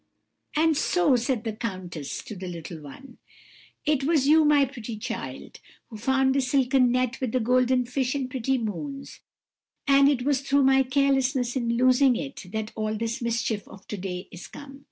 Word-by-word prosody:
"'And 315 +1 +3
so,' 310 -1 +2
said 240 -1 -1
the 225 -2 -3
countess 185 -9 -5
to 215 - -8
the 185 0 -7
little 170 -2 -7
one, 245 - -13 0.7
'it 295 -3 +1
was 290 -2 +2
you, 315 +1 +6
my 295 -2 +4
pretty 240 -4 -7
child, 230 +2 -6 0.3
who 220 - -7
found 265 +3 +2
the 275 - +2
silken 255 -1 +2
net 255 0 -1
with 255 -4 -2
the 255 - +2
golden 250 +1 +2
fish 260 +2 -1
and 270 -2 -2
pretty 260 +1 -1
moons; 275 - -5 0.7
and 275 0 +6
it 260 -4 0
was 275 -1 +1
through 275 0 +2
my 265 0 +5
carelessness 265 -1 +1
in 235 -2 0
losing 255 +1 +4
it 275 -7 -6
that 220 0 -4
all 215 0 -2
this 230 +3 -3
mischief 230 -3 -2
of 195 0 -14
to - - -3
day 180 -1 -5
is 175 - -10
come. 275 -1 -11
255 Hz, 180 wpm, -26 LUFS, 225-275 Hz, 0.7 s, you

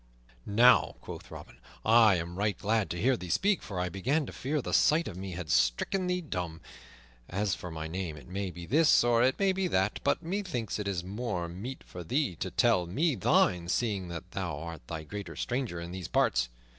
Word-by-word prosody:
"Now," 120 +4 +5
quoth - - -9
Robin, - - -11 0.3
"I 110 -3 +6
am 85 0 -4
right 105 +1 0
glad 110 0 0
to 85 - -3
hear 130 +6 +3
thee 90 -6 -7
speak, 200 - +2
for 95 -4 -5
I 90 - 0
began 130 - 0
to - - -8
fear 145 +4 -2
the - - -4
sight 160 +2 +4
of 95 - -6
me 95 0 -6
had 85 -2 -5
stricken 120 - +2
thee 180 0 0
dumb. 90 - -4 0.7
As 100 +1 0
for 90 - -5
my 80 -1 -5
name, 85 -2 -4
it 70 - -13
may 95 +1 -3
be 85 -1 -8
this 150 - +5
or 120 -1 +3
it 130 +2 +3
may 195 -1 +3
be 190 0 0
that; 95 - +1
but 140 +4 +1
methinks 170 - -3
it 105 - -3
is 95 -3 -2
more 100 -2 -3
meet 100 +10 -7
for 90 - -9
thee 130 - 0
to - - -3
tell 90 -1 +2
me 150 - +1
thine, 90 -4 +2
seeing 100 -2 0
that 85 -2 -7
thou 95 -8 -3
art 85 0 -7
the 80 -1 -5
greater 95 +1 -7
stranger 120 -9 -2
in 85 +1 -6
these 90 -2 -5
parts. 60 -1 +2
100 Hz, 210 wpm, -30 LUFS, 85-125 Hz, 0.7 s, I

